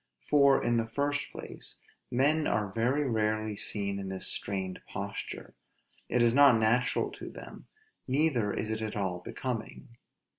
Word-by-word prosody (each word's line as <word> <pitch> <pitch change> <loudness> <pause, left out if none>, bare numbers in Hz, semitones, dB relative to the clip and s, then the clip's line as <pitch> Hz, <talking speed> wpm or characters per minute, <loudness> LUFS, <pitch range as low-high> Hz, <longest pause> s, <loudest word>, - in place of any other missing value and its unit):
For, 140 -2 +5
in 120 0 +2
the 115 -1 0
first 145 +5 -1
place, - - -7 0.3
men 150 +5 +2
are 105 -3 0
very 130 +6 +1
rarely 110 -2 0
seen 100 -1 -1
in 95 -1 -5
this 95 0 -1
strained 95 -2 -1
posture; - - -6 0.6
it 125 - +3
is 115 -1 +4
not 140 -3 +7
natural 115 +3 +2
to - - -8
them; - - -11 0.4
neither 130 -6 +2
is 110 - -2
it 110 0 -2
at 110 -1 -3
all 95 -4 -1
becoming. 115 +6 -5
115 Hz, 150 wpm, -30 LUFS, 105-135 Hz, 0.6 s, not